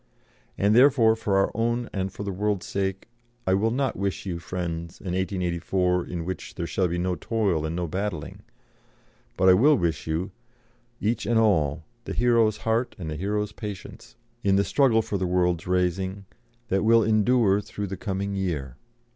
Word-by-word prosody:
And 100 +2 +3
therefore, 125 -3 +6
for 105 -3 0
our 95 - +2
own 115 +2 0
and 95 -1 -2
for 100 - -7
the 100 - -3
world's 100 0 -1
sake, 95 -1 -3 0.4
I 95 - +2
will 105 +4 +2
not 130 +2 -1
wish 100 0 -3
you, 90 -3 -3
friends, 85 -1 -5
an 90 -2 -4
1884 90 -1 0
in 85 -2 -4
which 95 +1 -6
there 85 - -3
shall 90 +2 0
be 85 +1 -2
no 90 +1 0
toil 100 -8 0
and 80 - -4
no 90 0 -1
battling; 90 -2 -4 1.0
but 95 - +3
I 95 - +9
will 140 +11 +5
wish 80 -6 -1
you, 85 +5 -2 0.7
each 110 +3 -1
and 120 - +2
all, 80 -8 +2 0.2
the - - -4
hero's 115 -3 +3
heart 115 +3 -1
and 80 -5 -5
the - - -3
hero's 105 +4 -2
patience, 105 -3 -8 0.3
in 100 -2 +3
the 100 - +3
struggle 115 -2 +3
for 100 - -3
the 95 - 0
world's 90 -2 +1
raising 95 +2 -1 0.4
that 95 +1 +1
will 115 +1 +5
endure 110 -1 +3
through 105 0 -5
the 95 0 -5
coming 100 0 -3
year." 80 -10 -3
95 Hz, 180 wpm, -25 LUFS, 90-110 Hz, 1.0 s, I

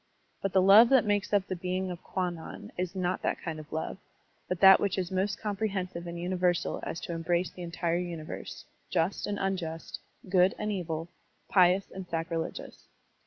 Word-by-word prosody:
But 195 - -2
the 190 -1 +5
love 210 +5 +8
that 265 -4 +5
makes 205 -1 0
up 200 -2 +3
the 190 - -3
being 185 +1 -2
of 175 - -7
Kwannon 180 +3 -4
is 180 +1 -3
not 185 0 -1
that - - -1
kind 160 -2 -5
of 155 - -11
love, 160 +4 -3 0.5
but 180 - -2
that 190 -1 +9
which 200 -1 0
is 185 -2 -2
most 190 +1 0
comprehensive 195 -5 -3
and 170 0 -5
uni 180 +2 -2
versal 175 -1 +1
as 165 - -4
to - - -5
embrace 170 +2 0
the 180 - -11
entire 170 0 -1
universe, 170 -3 -6 0.2
just 175 +2 0
and 205 - -2
unjust, 180 -5 -3 0.3
good 185 0 +4
and 210 0 -2
evil, 165 -4 -3 0.4
pious 185 0 +4
and 190 -1 -7
sacrilegious. 165 0 -4
180 Hz, 180 wpm, -29 LUFS, 170-195 Hz, 0.5 s, that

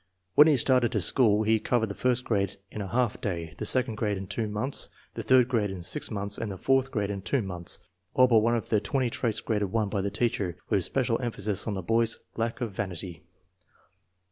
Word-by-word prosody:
When 150 - +8
he 150 -3 +4
started 125 -1 +4
to - - +2
school 110 -5 +3
he 110 +1 +3
covered 120 +1 +1
the - - -4
first 125 +3 +1
grade 100 -3 0
in 105 - -5
a 100 - -4
half 120 +1 0
day, 85 -5 -3
the 110 - -2
second 125 -3 +1
grade 105 -3 -1
in 95 - -6
two 110 +3 -2
months, 105 +7 -1 0.2
the - - -5
third 130 -2 +4
grade 115 -5 0
in 95 -2 -6
six - - -2
months, 100 -1 -3
and 110 -3 -3
the 95 - -6
fourth 135 +6 +2
grade 105 -5 -2
in 100 -1 -4
two 115 +6 0
months. 90 -3 -4 0.4
All 130 - +7
but 120 -3 +5
one 115 +2 +2
of 115 - -3
the 105 -2 +2
twenty 125 +3 -1
traits 110 -3 -1
graded 105 -4 -1
1 110 -2 0
by 100 -1 -1
the 100 - -1
teacher, 100 -5 -1
with 95 - +2
special 125 0 0
emphasis 110 -4 -2
on 105 - -1
the 95 - -4
boy's 115 +3 +2 0.2
lack 115 +2 -2
of 115 -3 -2
vanity. 90 -3 -5
110 Hz, 225 wpm, -27 LUFS, 100-120 Hz, 0.4 s, When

